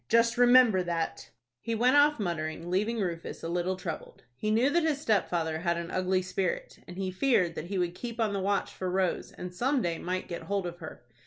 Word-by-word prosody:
Just 230 0 +4
remember 245 -5 +6
that!" 170 -2 -3 0.3
He 230 0 -3
went 250 +4 +3
off 290 -1 +5
muttering, 165 -2 -3
leaving 210 +5 +1
Rufus 170 -3 -4
a - - -2
little 175 +2 -1
troubled. 180 -3 -7
He 215 - -2
knew 235 +6 +3
that 345 - +3
his 315 -3 +1
stepfather 175 - 0
had 170 0 0
an 170 0 -5
ugly 185 0 +1
spirit, 185 0 -3
and 180 - -9
he 190 -1 -2
feared 185 -4 +2
that 160 - -5
he 195 +1 -3
would 175 -1 0
keep 235 +4 -7
on 220 -3 +1
the 200 - -1
watch 200 +1 0
for 185 - -3
Rose, 185 -1 0
and 180 0 -8
some 260 +9 +1
day 170 -7 -1
might 185 +1 -3
get 170 - -5
hold 200 -2 -2
of 175 0 -6
her. 155 -6 -9
185 Hz, 220 wpm, -29 LUFS, 175-230 Hz, 0.3 s, remember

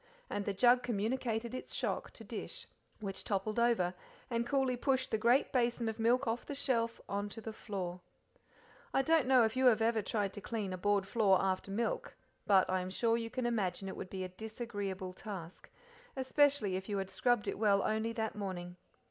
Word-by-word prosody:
And 205 - -2
the 205 - -1
jug 245 +5 +5
communicated 235 0 -1
its 255 - -5
shock - - -1
to - - -10
dish. - - -5 0.4
Which 195 -2 -4
toppled 210 +2 -1
over, 230 -7 +3 0.4
and 235 0 0
coolly 265 -1 +2
pushed 260 +1 0
the 220 - +1
great 240 +5 +4
basin 240 -2 +1
of 220 0 -3
milk 245 +4 +3
off 230 +2 -1
the 285 - -5
shelf 230 -4 0
on 200 +1 -2
to 205 - -8
the 220 0 -6
floor. 185 -5 -5 0.9
I 270 - +4
don't 320 -3 +3
know 260 -2 +6
if 220 - -1
ever - - 0
you 260 - +3
have 225 -2 +3
tried 205 -3 -1
to 205 - -7
clean 205 -3 -3
a - - -3
board 205 0 +2
floor 200 -4 +4
after 190 0 0
milk, 225 +4 -2 0.3
but 195 -2 +5
I 185 0 +1
am 180 - -4
sure 230 +4 +2
you 230 -1 -2
can 250 +1 -3
imagine 195 -5 -1
it 190 - -5
would 185 - -6
be 190 0 -4
a 185 - -4
disagreeable 205 -3 -5
task, 185 -4 -8 0.5
especially 265 -6 +3
if 190 +2 -5
you 205 - 0
had 190 -1 -3
scrubbed 245 -4 +1
it - - -2
well 200 -2 +4
only 220 +1 0
that 220 -1 -2
morning. 180 -3 -5
220 Hz, 200 wpm, -34 LUFS, 195-240 Hz, 0.9 s, know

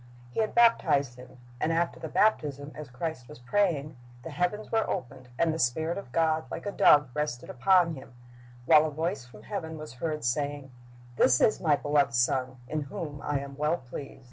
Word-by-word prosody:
"' 120 0 -21
He - - -2
had 220 -1 0
baptized 145 - +4
Him, 125 0 -13 0.2
and 160 - 0
after 170 +1 0
the 160 - -5
baptism, 145 -9 +1
as 150 -4 -9
Christ 125 -1 -5
was 150 - -11
praying, 150 +1 0 0.3
the 165 - -7
heavens 180 +8 -2
were 225 -1 +1
opened, 130 -7 -5
and 165 +1 +2
the 160 - -4
Spirit 160 +7 0
of 200 -11 -8
God 160 +1 +1
like - - -6
a 205 - -2
dove 145 -8 +5
rested 150 -4 -3
upon 175 +5 +3
Him, 130 -4 -11 0.5
while 155 +4 +6
a - - -2
voice 160 -1 -3
from 105 -3 -15
heaven 160 - -5
was 155 -5 -9
heard 150 +4 -3
saying, 140 +2 -2 0.5
"This 125 -1 +5
is 215 - +3
My 155 -5 +4
beloved 145 -4 +1
Son, 130 +1 +1
in 155 +3 -2
whom 145 0 -6
I 145 -2 -1
am 140 0 -8
well 150 +3 +1
pleased." 135 +1 -9
150 Hz, 195 wpm, -28 LUFS, 130-165 Hz, 0.5 s, while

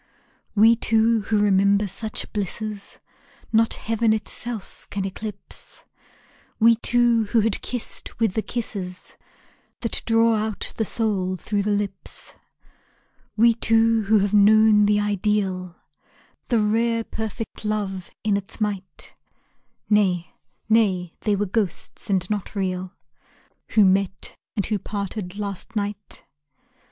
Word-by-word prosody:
We 225 +3 +6
two 225 0 +2
who 215 - +3
remember 200 0 +3
such 215 +3 -4
blisses 210 0 -4 0.6
Not 225 +1 +3
heaven 225 0 +1
itself 220 0 -5
can 195 -1 -3
eclipse, 200 +1 -7 0.7
We 230 +1 +6
two 235 -1 +3
who 220 +2 +2
had 220 -1 0
kissed 245 -2 -4
with 225 -5 +2
the 220 - 0
kisses 195 -6 -5 0.7
That 230 - -1
draw 225 0 +4
out 215 -1 -3
the 220 - 0
soul 195 -5 +1
through 200 +3 -2
the 205 - -1
lips, 205 -2 -3 1.0
We 230 +2 +6
two 225 -1 +3
who 215 +2 +4
have 200 0 +1
known 210 0 +6
the 210 0 +3
ideal, 200 -3 -1 0.7
The 235 - +2
rare 230 +2 +1
perfect 220 +1 -6
love 200 -4 -2
in 210 -2 +2
its 200 +2 -6
might 200 -3 -4 0.7
Nay, 190 -5 +2 0.3
nay, 195 -6 +2
they 210 -2 +1
were 205 +1 0
ghosts, 200 0 -3
and 185 -2 +1
not 210 0 -3
real, 185 -2 -2 0.8
Who 210 -2 +6
met, 195 0 0 0.2
and 200 - 0
who 210 -2 -1
parted, 200 -1 -5
last 200 +1 -5
night. 205 -1 -4
210 Hz, 125 wpm, -23 LUFS, 195-225 Hz, 1.0 s, We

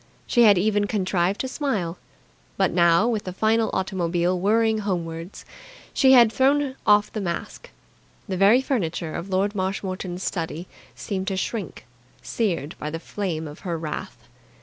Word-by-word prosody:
She 240 - +2
had 205 -3 +6
even 205 +2 +1
contrived 190 -2 0
to 260 - -3
smile. 210 - -2 0.6
But - - +2
now, 170 +4 +4
with 225 -4 -1
the 185 - -4
final 220 +3 +2
automobile 180 -1 0
whirring 220 +3 +2
homewards, 170 -3 -4 0.5
she 265 -1 +5
had 235 -4 +7
thrown 275 0 +2
off 210 0 +4
the 215 - -3
mask. 170 -3 -5 0.6
The 190 - -2
very 200 +7 +5
furniture 170 - -2
of 170 +3 -5
Lord 195 +2 0
Marshmoreton's 185 -2 -3
study 170 0 -4 0.3
seemed 190 +9 -4
to 195 -2 -1
shrink, 195 -2 -4 0.4
seared 175 -10 -2
by 150 - -4
the 165 +2 -5
flame 165 -4 -4
of 150 - -10
her 170 -3 -3
wrath. 155 -2 -6
190 Hz, 150 wpm, -24 LUFS, 170-215 Hz, 0.6 s, had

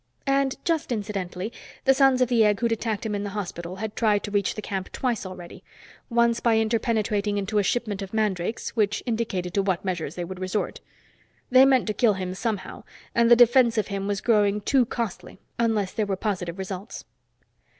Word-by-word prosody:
And, 275 -1 +1
just 325 -5 0
incidentally, 200 -2 -3 0.3
the 270 - +6
Sons 270 -1 +4
of 250 - +4
the 235 -2 +3
Egg 210 -1 +3
who'd 235 -1 0
attacked 225 -1 -2
him 215 - -2
in 205 0 -2
the 205 - -3
hospital 175 -2 -5
had 210 +2 -5
tried 210 -3 +2
to 205 - -5
reach 200 -2 0
the - - -5
camp 190 -2 -4
twice 240 -6 -2
already, 180 -2 -10 0.5
once 235 -1 +2
by 230 -2 +3
interpenetrating 220 -2 0
into 205 +1 0
a - - +2
shipment 210 -1 -1
of 195 -1 -6
mandrakes, 215 -1 -1
which 210 -2 +1
indicated 215 -7 -2
to 200 - +2
what 190 -1 -1
measures 170 -5 -3
they 175 - -3
would 185 +1 -8
resort. 185 +3 -2 0.7
They 260 +1 +8
meant 265 -2 +4
to 215 - -1
kill 225 -1 +3
him 185 -1 -4
somehow, 205 -1 -4 0.3
and 235 0 +3
the 240 - +9
defense 240 0 +5
of 215 - 0
him 195 0 -3
was 200 -1 -1
growing 210 -3 +2
too 250 +3 +2
costly 230 -5 -5 0.2
unless 220 -5 +1
there 215 -2 -1
were 195 - 0
positive 185 -3 -3
results. 190 +2 -6
210 Hz, 195 wpm, -25 LUFS, 195-235 Hz, 0.7 s, the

